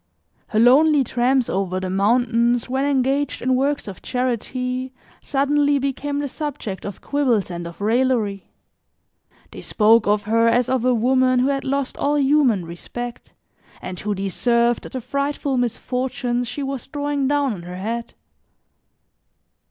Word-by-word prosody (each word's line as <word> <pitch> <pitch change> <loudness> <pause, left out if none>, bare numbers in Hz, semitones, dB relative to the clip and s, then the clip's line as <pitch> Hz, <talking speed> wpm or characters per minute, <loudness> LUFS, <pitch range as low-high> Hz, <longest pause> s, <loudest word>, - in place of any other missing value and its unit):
Her - - -3
lonely 280 +5 +5
tramps 250 +1 +1
over 185 -1 -1
the 185 0 -4
mountains, 235 +4 +2
when 265 +2 -1
engaged 275 +1 0
in 260 +1 0
works 280 +1 0
of 195 - -8
charity, 250 +1 -2 0.3
suddenly 285 +1 +1
became 280 +1 -2
the 290 0 -1
subject 275 - -5
of 200 - -7
quibbles 250 -10 0
and 170 -1 -5
of 170 - -11
raillery. 220 -2 0 1.0
They - - -9
spoke 220 0 +3
of 210 0 +2
her 230 +2 +2
as 240 +1 +2
of 260 -3 +1
a 255 - +4
woman 255 +2 +3
who 255 +2 +2
had 275 -1 -1
lost 275 0 -2
all 290 +1 +1
human 270 - +3
respect 240 +8 -8 0.5
and 185 -1 -7
who 210 0 -2
deserved 235 +5 0
the 260 - -4
frightful 280 +2 -2
misfortunes 245 0 -2
she 265 +4 -4
was 270 -2 -5
drawing 285 -1 -1
down 285 -3 +1
on 185 - -8
her 180 +1 -8
head. 230 +4 -4
250 Hz, 145 wpm, -21 LUFS, 220-275 Hz, 1.0 s, lonely